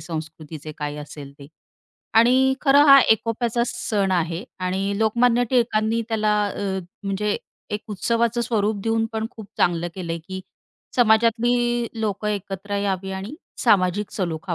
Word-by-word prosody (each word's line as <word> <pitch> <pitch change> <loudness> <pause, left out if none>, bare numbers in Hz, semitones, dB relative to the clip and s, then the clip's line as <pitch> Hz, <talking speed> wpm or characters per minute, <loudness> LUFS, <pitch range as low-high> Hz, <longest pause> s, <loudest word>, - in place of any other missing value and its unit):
संस्कृतीचे 155 -1 -7
काही 150 -1 -4
असेल 145 -1 -9
ते 140 - -11 0.7
आणि 260 +3 +5
खरं 285 0 +5
हा 275 -1 +10
एकोप्याचा 230 +2 +1
सण 200 -5 -1
आहे 170 0 -1 0.2
आणि 190 +2 -1
लोकमान्य 235 +2 +3
टिळकांनी 230 -2 +2
त्याला 215 -2 +1
अ, 195 -1 -3 0.2
म्हणजे 200 +1 -1 0.4
एक 210 +1 -2
उत्सवाचं 235 +3 0
स्वरूप 220 -3 0
देऊन 225 0 +1
पण 220 0 -2
खूप 220 -4 -11
चांगलं 175 0 +1
केलंय 170 -3 -4
की 190 0 -5 0.6
समाजातली 240 +1 +3
लोक 210 -1 -2
एकत्र 200 0 -3
यावी 195 -1 -2
आणि 190 +7 -6 0.3
सामाजिक 200 -2 +2
सलोखा 175 -1 -3
210 Hz, 130 wpm, -23 LUFS, 185-230 Hz, 0.7 s, हा